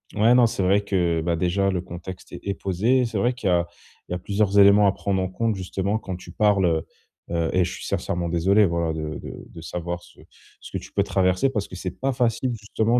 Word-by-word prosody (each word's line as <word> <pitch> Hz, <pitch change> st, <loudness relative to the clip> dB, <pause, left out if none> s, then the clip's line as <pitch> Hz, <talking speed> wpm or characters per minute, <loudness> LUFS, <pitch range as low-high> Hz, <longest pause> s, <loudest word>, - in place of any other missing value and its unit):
Ouais, 110 Hz, +4 st, +5 dB
non, 125 Hz, -1 st, +6 dB
c'est 115 Hz, -2 st, -1 dB
vrai 95 Hz, +2 st, +3 dB
que, 90 Hz, -5 st, 0 dB
bah, 85 Hz, +1 st, 0 dB
déjà, 90 Hz, +3 st, +1 dB
le 90 Hz, -2 st, -1 dB
contexte 90 Hz, +1 st, -9 dB
est 100 Hz, -, -4 dB
posé. 110 Hz, +8 st, +1 dB
C'est 115 Hz, -2 st, -3 dB
vrai 120 Hz, +6 st, +2 dB
qu'il 120 Hz, -5 st, -4 dB
y -, -, +3 dB
a 85 Hz, -1 st, +3 dB, 0.4 s
il -, -, -11 dB
y -, -, 0 dB
a -, -, -4 dB
plusieurs 100 Hz, +1 st, +1 dB
éléments 100 Hz, +1 st, +7 dB
à 100 Hz, -, +5 dB
prendre 95 Hz, -1 st, -1 dB
en 95 Hz, -, -2 dB
compte, 110 Hz, +3 st, -1 dB
justement, 95 Hz, +2 st, -2 dB
quand 95 Hz, -4 st, -6 dB
tu -, -, -12 dB
parles, 105 Hz, -3 st, +3 dB
heu 80 Hz, -2 st, +1 dB, 0.5 s
heu 85 Hz, -1 st, 0 dB
et 90 Hz, -, +4 dB
je 85 Hz, -, -3 dB
suis -, -, -8 dB
sincèrement 85 Hz, 0 st, -2 dB
désolé 95 Hz, +5 st, +3 dB
voilà 85 Hz, -2 st, 0 dB
de 75 Hz, -1 st, -4 dB
de -, -, -9 dB
de 80 Hz, -, -11 dB
savoir 85 Hz, +1 st, -5 dB
ce -, -, -19 dB, 0.4 s
ce -, -, -12 dB
que -, -, -2 dB
tu -, -, -9 dB
peux -, -, +1 dB
traverser, 95 Hz, +6 st, +2 dB
parce 105 Hz, -6 st, -2 dB
que -, -, -8 dB
c'est 90 Hz, 0 st, -5 dB
pas 135 Hz, +1 st, +1 dB
facile, 125 Hz, 0 st, 0 dB
justement, 110 Hz, +3 st, +1 dB
95 Hz, 245 wpm, -24 LUFS, 85-105 Hz, 0.5 s, éléments